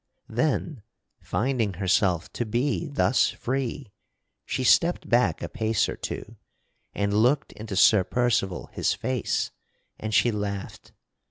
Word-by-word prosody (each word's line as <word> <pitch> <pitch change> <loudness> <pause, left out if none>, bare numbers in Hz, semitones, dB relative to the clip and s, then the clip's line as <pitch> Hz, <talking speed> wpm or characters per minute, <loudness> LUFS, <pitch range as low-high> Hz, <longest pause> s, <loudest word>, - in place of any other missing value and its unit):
Then, 135 +2 -1 0.4
finding 115 -4 -1
herself 90 -2 +1
to - - -2
be 125 +8 -1
thus 140 -4 +2
free, 130 -2 -3 0.6
she 130 - -2
stepped 170 +7 +3
back 120 +1 +2
a - - -2
pace 110 -2 0
or - - -4
two - - -7 0.6
and 100 0 0
looked 125 +7 +2
into 105 -2 -7
Sir 100 +1 +6
Percival 110 -4 0
his - - 0
face, 130 -4 -1 0.5
and 110 - -4
she 120 +3 +4
laughed. 100 -2 -5
115 Hz, 125 wpm, -26 LUFS, 100-130 Hz, 0.6 s, Sir